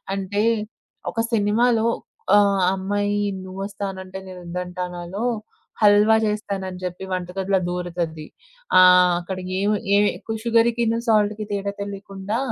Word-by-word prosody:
అంటే 200 Hz, +2 st, -1 dB, 0.7 s
ఒక 230 Hz, -, -4 dB
సినిమాలో 225 Hz, +2 st, +3 dB, 0.5 s
ఆహ్, 200 Hz, -2 st, +3 dB
అమ్మాయి 205 Hz, +2 st, -1 dB, 0.2 s
'నువోస్తానంటే 190 Hz, 0 st, -6 dB
నేనోద్దంటానా'లో 180 Hz, +2 st, -5 dB, 0.6 s
హల్వా 210 Hz, +1 st, +6 dB
చేస్తానని 195 Hz, -3 st, -3 dB
చెప్పి 180 Hz, +1 st, -5 dB
వంటగదిలో 185 Hz, +2 st, -1 dB
దోరుతది, 170 Hz, -3 st, -3 dB, 0.5 s
ఆహ్, 180 Hz, -1 st, +7 dB
అక్కడ 185 Hz, +2 st, -5 dB, 0.2 s
ఏమి 205 Hz, +1 st, +2 dB, 0.2 s
ఏమి 205 Hz, 0 st, +4 dB, 0.3 s
సుగర్‌కిను 230 Hz, 0 st, +2 dB
సాల్ట్‌కి 215 Hz, -1 st, +2 dB
తేడా 200 Hz, 0 st, -2 dB
తెలియకుండా, 200 Hz, +1 st, -5 dB
195 Hz, 95 wpm, -22 LUFS, 180-210 Hz, 0.7 s, ఆహ్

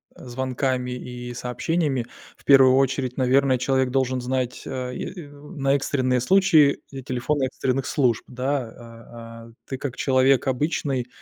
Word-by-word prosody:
звонками 130 Hz, 0 st, -3 dB
и 125 Hz, -1 st, -7 dB
сообщениями, 130 Hz, +1 st, -2 dB, 0.3 s
в -, -, -25 dB
первую 135 Hz, -2 st, +6 dB
очередь, 135 Hz, -1 st, 0 dB
наверное, 130 Hz, 0 st, +3 dB
человек 130 Hz, 0 st, +1 dB
должен 130 Hz, -1 st, 0 dB
знать, 125 Hz, 0 st, -3 dB
э, 125 Hz, -1 st, -5 dB
и 175 Hz, -6 st, -7 dB
на 145 Hz, -1 st, -2 dB
экстренные 130 Hz, -2 st, 0 dB
случаи, 160 Hz, -2 st, +4 dB
э, 135 Hz, -1 st, -7 dB
телефон 130 Hz, +4 st, -2 dB
экстренных 130 Hz, 0 st, -1 dB
служб, 125 Hz, -6 st, +1 dB
да, 130 Hz, +2 st, -2 dB
а, 115 Hz, 0 st, -12 dB
а. -, -, -16 dB, 0.2 s
Ты 135 Hz, -, -4 dB
как 130 Hz, -2 st, -5 dB
человек 130 Hz, 0 st, +2 dB
обычный, 130 Hz, -2 st, -1 dB
130 Hz, 140 wpm, -23 LUFS, 125-140 Hz, 0.3 s, первую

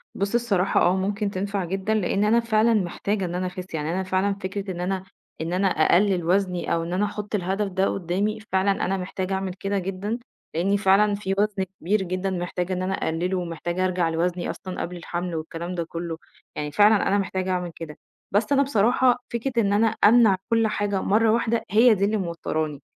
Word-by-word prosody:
بُص، 200 Hz, +2 st, -2 dB
الصراحة 200 Hz, -6 st, +2 dB
آه، 180 Hz, +1 st, +4 dB
ممكن 200 Hz, +2 st, -1 dB
تنفع 200 Hz, 0 st, -2 dB
جدًا، 195 Hz, +4 st, -1 dB
لإن 200 Hz, -1 st, +1 dB
أنا 220 Hz, +3 st, +4 dB
فعلًا 230 Hz, 0 st, +2 dB
محتاجة 200 Hz, 0 st, -1 dB
إن 175 Hz, 0 st, -4 dB
أنا 185 Hz, +1 st, -1 dB
أخِس، 180 Hz, 0 st, -8 dB
يعني 155 Hz, 0 st, -2 dB
أنا 190 Hz, +2 st, -1 dB
فعلًا 190 Hz, +2 st, +1 dB
فكرة 195 Hz, 0 st, -5 dB
إن 175 Hz, -1 st, -5 dB
أنا 185 Hz, +1 st, -2 dB, 0.4 s
إن 165 Hz, +2 st, -3 dB
أنا 190 Hz, +2 st, +2 dB
أقلِّل 180 Hz, +2 st, +3 dB
وزْني 180 Hz, 0 st, +1 dB
أو 165 Hz, -, 0 dB
إن 170 Hz, +1 st, -4 dB
أنا 195 Hz, +3 st, +1 dB
أحط 210 Hz, 0 st, -4 dB
الهدف 195 Hz, +2 st, -1 dB
ده 190 Hz, +1 st, +1 dB
قدامي، 195 Hz, +4 st, -1 dB
فعلًا 190 Hz, +1 st, +3 dB
أنا 195 Hz, +1 st, 0 dB
محتاجة 185 Hz, +1 st, -3 dB
أعمل 190 Hz, -1 st, -2 dB
كده 195 Hz, +1 st, -2 dB
جدًا، 195 Hz, +5 st, -3 dB, 0.4 s
لإن 195 Hz, +5 st, +2 dB
فعلًا 200 Hz, +1 st, +4 dB
في 195 Hz, -1 st, -2 dB
وزْن 205 Hz, -2 st, +1 dB, 0.2 s
كبير 195 Hz, +4 st, +1 dB
جدًا 185 Hz, +1 st, -2 dB
محتاجة 180 Hz, 0 st, -2 dB
إن 180 Hz, -, -2 dB
أنا 185 Hz, +1 st, -1 dB
أقلّله 180 Hz, +2 st, -1 dB
ومحتاجة 175 Hz, +1 st, -2 dB
أرجع 180 Hz, -2 st, +1 dB
لوزْني 175 Hz, +2 st, -1 dB
أصلًا 185 Hz, -1 st, -5 dB
قبل 180 Hz, +1 st, -5 dB
الحمْل 175 Hz, 0 st, -4 dB
والكلام 165 Hz, +3 st, -5 dB
ده 170 Hz, -, -1 dB
كلّه، 165 Hz, 0 st, -5 dB, 0.4 s
يعني 150 Hz, 0 st, -3 dB
فعلًا 210 Hz, +4 st, +4 dB
أنا 200 Hz, -, +3 dB
محتاجة 190 Hz, -1 st, -2 dB
أعمل 180 Hz, -1 st, -2 dB
كده. 155 Hz, -2 st, -8 dB, 0.3 s
بس 210 Hz, +6 st, +1 dB
أنا 280 Hz, 0 st, +5 dB
بصراحة 245 Hz, 0 st, +2 dB
فكرة 235 Hz, +3 st, -1 dB
إن 200 Hz, -1 st, +1 dB
أنا 220 Hz, +2 st, +4 dB
أمنع 220 Hz, -2 st, +5 dB
كل 225 Hz, -1 st, +3 dB
حاجة 205 Hz, -2 st, -1 dB
مرة 220 Hz, +2 st, +3 dB
واحدة، 230 Hz, 0 st, +1 dB
هي 225 Hz, +3 st, +6 dB
دي 200 Hz, 0 st, +1 dB
اللي 215 Hz, +2 st, +1 dB
موتّراني، 160 Hz, -5 st, -3 dB
190 Hz, 200 wpm, -24 LUFS, 180-205 Hz, 0.4 s, هي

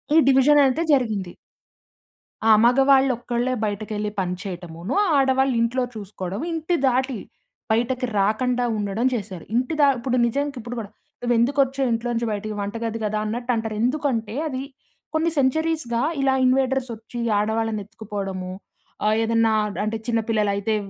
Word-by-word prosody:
ఈ -, -, +7 dB
డివిజనయితే 275 Hz, +2 st, +5 dB
జరిగింది. 215 Hz, -9 st, 0 dB, 1.2 s
ఆ! -, -, +8 dB
మగవాళ్ళొక్కళ్ళే 255 Hz, -1 st, +3 dB
బయటకెళ్ళి 210 Hz, 0 st, -3 dB
పని 180 Hz, -1 st, -1 dB
చేయటమునో, 175 Hz, -, -5 dB, 0.2 s
ఆడవాళ్ళు 265 Hz, -1 st, +3 dB
ఇంట్లో 250 Hz, +2 st, +1 dB
చూసుకోడం, 195 Hz, -2 st, -6 dB
ఇంటి 325 Hz, +2 st, -1 dB
దాటి 260 Hz, -1 st, +1 dB, 0.5 s
బయటకి 250 Hz, +3 st, +1 dB
రాకండా 245 Hz, +5 st, +1 dB
ఉండడం 205 Hz, +4 st, -1 dB
చేశారు. 195 Hz, -6 st, -5 dB
ఇంటి 255 Hz, +6 st, +1 dB
ద -, -, +6 dB
ఇప్పుడు 250 Hz, +1 st, -1 dB
నిజానికిప్పుడు 245 Hz, -1 st, -3 dB
కూడా, 205 Hz, -, -6 dB, 0.3 s
నువ్వెందుకొచ్చావు 260 Hz, +2 st, +2 dB
ఇంట్లోంచి 235 Hz, 0 st, -1 dB
బయటికి 210 Hz, +1 st, -4 dB
వంటగది 225 Hz, +2 st, -3 dB
గదా 215 Hz, 0 st, -1 dB
అన్నట్టంటారు. 225 Hz, -1 st, -2 dB
ఎందుకంటే, 245 Hz, -5 st, -1 dB
అది 260 Hz, -3 st, -4 dB, 0.5 s
కొన్ని 320 Hz, +2 st, +2 dB
సెంచరీస్‌గా 275 Hz, -3 st, +1 dB, 0.2 s
ఇలా 270 Hz, -1 st, +3 dB
ఇన్‌వేడర్సొచ్చి 255 Hz, -3 st, 0 dB, 0.2 s
ఆడవాళ్ళనెత్తుకుపోడము. 210 Hz, -3 st, -3 dB, 0.5 s
ఆహ్, 215 Hz, +1 st, +3 dB
ఏదన్నా 225 Hz, 0 st, +2 dB, 0.3 s
అంటే, 215 Hz, +1 st, -1 dB
చిన్న 230 Hz, -1 st, +2 dB
పిల్లలయితే 210 Hz, -1 st, +1 dB
235 Hz, 115 wpm, -23 LUFS, 215-260 Hz, 1.2 s, ఆ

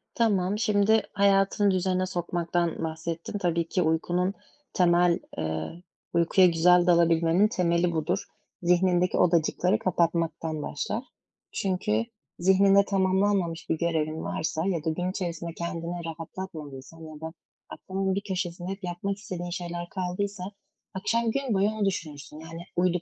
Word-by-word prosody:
Tamam, 205 Hz, -4 st, +2 dB
şimdi 215 Hz, 0 st, +3 dB
hayatını 200 Hz, 0 st, +3 dB
düzene 185 Hz, 0 st, +1 dB
sokmaktan 175 Hz, -2 st, -1 dB
bahsettin. 165 Hz, +4 st, -4 dB
Tabii 170 Hz, -3 st, 0 dB
ki 180 Hz, +1 st, 0 dB
uykunun 175 Hz, +3 st, +1 dB, 0.4 s
temel, 175 Hz, -1 st, +4 dB, 0.2 s
eee, 80 Hz, -, -4 dB, 0.3 s
uykuya 170 Hz, +2 st, +5 dB
güzel 175 Hz, +1 st, +5 dB
dalabilmenin 170 Hz, +2 st, +4 dB
temeli 175 Hz, -3 st, +1 dB
budur. 160 Hz, -2 st, -1 dB, 0.4 s
Zihnindeki 180 Hz, 0 st, +2 dB
odacıkları 175 Hz, +2 st, +2 dB
kapatmaktan 165 Hz, -3 st, 0 dB
başlar. 145 Hz, -, -3 dB, 0.5 s
Çünkü 200 Hz, +4 st, 0 dB, 0.3 s
zihninde 195 Hz, +2 st, +5 dB
tamamlanmamış 190 Hz, -3 st, +1 dB
bir 160 Hz, -, +1 dB
görevin 160 Hz, -1 st, -1 dB
varsa 160 Hz, +1 st, -2 dB
ya 175 Hz, -5 st, -1 dB
da 160 Hz, -, 0 dB
gün 180 Hz, +3 st, -1 dB
içerisinde 170 Hz, -3 st, -4 dB
kendini 170 Hz, 0 st, -4 dB
rahatlatmadıysan 165 Hz, -3 st, -8 dB
ya 155 Hz, -1 st, -10 dB
da 160 Hz, 0 st, -6 dB, 0.4 s
aklının 190 Hz, 0 st, -2 dB
bir 200 Hz, -, -1 dB
köşesinde 180 Hz, -2 st, -4 dB
hep 195 Hz, +1 st, -7 dB
yapmak 180 Hz, +3 st, -3 dB
istediğin 175 Hz, -3 st, -6 dB
şeyler 175 Hz, 0 st, -5 dB
kaldıysa 190 Hz, +1 st, -3 dB, 0.5 s
akşam 230 Hz, +4 st, 0 dB
gün 270 Hz, -1 st, -1 dB
boyu 200 Hz, +1 st, +3 dB
onu 215 Hz, -2 st, -1 dB
düşünürsün. 155 Hz, -5 st, -4 dB
Yani, 165 Hz, +1 st, -9 dB
uyuduk 180 Hz, -1 st, +1 dB
175 Hz, 130 wpm, -27 LUFS, 165-190 Hz, 0.5 s, uykuya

